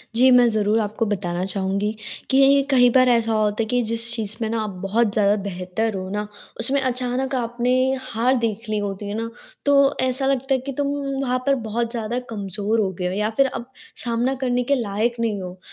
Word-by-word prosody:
जी, 255 Hz, +2 st, +6 dB
मैं 245 Hz, -1 st, +6 dB
ज़रूर 215 Hz, 0 st, +1 dB
आपको 215 Hz, +1 st, -1 dB
बताना 185 Hz, -3 st, -2 dB
चाहूँगी, 195 Hz, +2 st, -1 dB, 0.4 s
कि 275 Hz, +1 st, +5 dB
कहीं 245 Hz, -2 st, +6 dB
बार 255 Hz, 0 st, +5 dB
ऐसा 230 Hz, -2 st, +2 dB
होता 215 Hz, 0 st, +1 dB
है -, -, -3 dB
कि 245 Hz, +2 st, +1 dB
जिस 230 Hz, +1 st, 0 dB
चीज़ 215 Hz, -3 st, -3 dB
में 220 Hz, -, -1 dB
ना 230 Hz, 0 st, -1 dB
आप 215 Hz, -, -3 dB
बहुत 210 Hz, +2 st, +1 dB
ज़्यादा 205 Hz, -2 st, +3 dB
बेहतर 195 Hz, +3 st, -3 dB
हो 185 Hz, 0 st, -5 dB
ना, 210 Hz, +1 st, -3 dB, 0.3 s
उसमें 265 Hz, +5 st, +2 dB
अचानक 255 Hz, +1 st, -1 dB
आपने 240 Hz, 0 st, -1 dB, 0.3 s
हार 255 Hz, 0 st, 0 dB
देख 230 Hz, -1 st, -2 dB
ली 215 Hz, -, 0 dB
होती 200 Hz, 0 st, -4 dB
है -, -, -3 dB
ना, 230 Hz, 0 st, -3 dB, 0.4 s
तो 280 Hz, 0 st, +4 dB
ऐसा 260 Hz, +1 st, 0 dB
लगता 270 Hz, 0 st, +1 dB
है 260 Hz, -, +2 dB
कि 275 Hz, -, -3 dB
तुम 285 Hz, -1 st, 0 dB, 0.3 s
वहाँ 255 Hz, -1 st, 0 dB
पर 275 Hz, -1 st, +3 dB
बहुत 235 Hz, +2 st, -2 dB
ज़्यादा 235 Hz, 0 st, -2 dB
कमज़ोर 205 Hz, +1 st, -2 dB
हो 195 Hz, -3 st, +1 dB
गए 180 Hz, -, -2 dB
हो 180 Hz, -, -2 dB
या 210 Hz, +2 st, 0 dB
फिर 275 Hz, -, +5 dB
अब 255 Hz, -2 st, -4 dB, 0.4 s
सामना 240 Hz, +2 st, 0 dB
करने 250 Hz, -1 st, +1 dB
के 280 Hz, +3 st, +2 dB
लायक 230 Hz, 0 st, -1 dB
नहीं 220 Hz, -4 st, -1 dB
हो। 180 Hz, 0 st, -8 dB
230 Hz, 210 wpm, -22 LUFS, 205-250 Hz, 0.4 s, जी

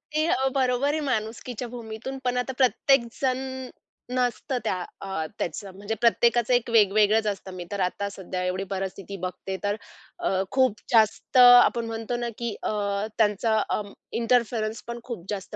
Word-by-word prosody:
ते 310 Hz, +1 st, +3 dB
अ, 270 Hz, -6 st, +2 dB
बरोबर 260 Hz, +1 st, +2 dB
आहे 315 Hz, -, 0 dB
माणुसकीच्या 235 Hz, +1 st, -3 dB
भूमीतून 235 Hz, +2 st, -7 dB
पण 250 Hz, 0 st, 0 dB
आता 255 Hz, +1 st, -1 dB
प्रत्येकजण 255 Hz, -1 st, +2 dB, 0.8 s
नसतं 250 Hz, +2 st, 0 dB
त्या 185 Hz, -, 0 dB, 0.2 s
अ, 190 Hz, -5 st, -3 dB
त्याचं. 195 Hz, +2 st, -4 dB
म्हणजे 205 Hz, +3 st, -4 dB
प्रत्येकाचं 235 Hz, +1 st, +3 dB
एक 245 Hz, -1 st, +2 dB
वेगवेगळच 215 Hz, 0 st, +4 dB
असतं 195 Hz, -2 st, -4 dB
मी 180 Hz, -1 st, -6 dB
तर 200 Hz, -, -3 dB
आता 200 Hz, +2 st, -4 dB
सध्या 185 Hz, -2 st, -5 dB
एवढी 185 Hz, +1 st, -1 dB
परिस्थिती 195 Hz, +1 st, -5 dB
बघते. 190 Hz, +1 st, -6 dB
तर 205 Hz, +1 st, +1 dB, 0.4 s
अ, -, -, 0 dB, 0.2 s
खूप 255 Hz, -6 st, +2 dB
जास्त 220 Hz, +2 st, +3 dB
आपण 245 Hz, -1 st, +8 dB
म्हणतो 225 Hz, +1 st, -3 dB
ना 240 Hz, 0 st, -2 dB
की 235 Hz, -3 st, -3 dB
अ, -, -, 0 dB, 0.5 s
त्यांचा 220 Hz, +1 st, +2 dB
अं, 205 Hz, -1 st, -2 dB, 0.3 s
इंटरफेरन्स 230 Hz, -2 st, +1 dB
पण 235 Hz, 0 st, -5 dB
खूप 225 Hz, -8 st, -7 dB
जास्त 195 Hz, -2 st, -5 dB
225 Hz, 155 wpm, -26 LUFS, 200-245 Hz, 0.8 s, आपण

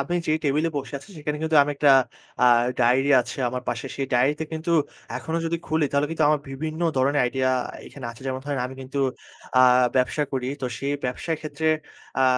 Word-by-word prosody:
আপনি 140 Hz, +6 st, -2 dB
যে 155 Hz, -, +2 dB
টেবিলে 150 Hz, +3 st, +2 dB
বসে 140 Hz, +1 st, -4 dB
আছি, -, -, -16 dB
সেখানে 150 Hz, 0 st, -3 dB
কিন্তু 160 Hz, -1 st, +2 dB
আমি 145 Hz, -, -1 dB
একটা 145 Hz, -1 st, +5 dB, 0.5 s
আ -, -, +7 dB, 0.4 s
ডায়েরি 130 Hz, +4 st, +3 dB
আছে -, -, -7 dB
আমার 125 Hz, +1 st, -4 dB
পাশে। 120 Hz, +3 st, -3 dB
সেই 135 Hz, -1 st, -2 dB
ডায়েরিতে 140 Hz, +6 st, +2 dB
কিন্তু 160 Hz, +2 st, -2 dB, 0.4 s
এখনো 160 Hz, -, -3 dB
যদি 170 Hz, +1 st, 0 dB
খুলি 160 Hz, -1 st, +1 dB
তাহলে 140 Hz, +1 st, +2 dB
কিন্তু 165 Hz, -1 st, +1 dB
আমার 150 Hz, -1 st, +2 dB
বিভিন্ন 155 Hz, +4 st, -5 dB, 0.2 s
ধরনের 140 Hz, +3 st, +2 dB
আইডিয়া 130 Hz, +1 st, +1 dB, 0.4 s
এখানে 135 Hz, -4 st, -8 dB
আছে। 115 Hz, +3 st, -13 dB
যেমন 130 Hz, 0 st, -2 dB
ধরেন 145 Hz, -2 st, -2 dB
আমি 130 Hz, -, -9 dB
কিন্তু 130 Hz, +2 st, -5 dB, 0.6 s
আ -, -, +8 dB, 0.3 s
ব্যবসা 130 Hz, +4 st, +2 dB
করি। 130 Hz, -1 st, -2 dB
তো -, -, 0 dB
সেই 140 Hz, +1 st, -2 dB
ব্যবসার 140 Hz, +6 st, -2 dB
ক্ষেত্রে 155 Hz, +1 st, -2 dB, 0.5 s
আ -, -, +5 dB
140 Hz, 195 wpm, -24 LUFS, 130-155 Hz, 0.6 s, আ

